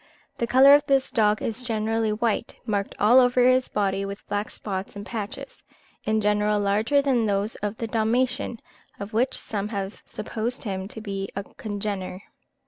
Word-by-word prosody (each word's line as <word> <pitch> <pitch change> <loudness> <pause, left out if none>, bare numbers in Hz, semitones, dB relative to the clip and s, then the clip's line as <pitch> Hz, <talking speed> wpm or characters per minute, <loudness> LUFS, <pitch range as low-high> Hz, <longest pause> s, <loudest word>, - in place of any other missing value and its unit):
The 235 - 0
colour 265 +3 +7
of 290 0 +6
this 270 -2 +2
dog 210 -1 +2
is 225 +2 -2
generally 225 -2 0
white, 225 +1 -1
marked 205 -3 -2
all 230 +5 +7
over 250 0 +4
his 255 0 +3
body 195 -1 0
with 200 +1 -7
black 205 +1 -2
spots 195 -1 -5
and 205 0 -7
patches, 215 -1 -6 0.4
in 215 0 +1
general 210 0 +2
larger 215 +8 +2
than 250 -5 +2
those 205 +2 0
of 210 +1 -4
the 230 - -3
Dalmatian, 235 +2 0 0.4
of 200 +2 -7
which 245 +4 +2
some 205 -1 -3
have 200 -2 -5
supposed 225 +3 -4
him 190 -3 -3
to 220 - -9
be 195 -2 -4
a 200 - -3
congener. 200 -2 -5
215 Hz, 170 wpm, -25 LUFS, 200-235 Hz, 0.4 s, colour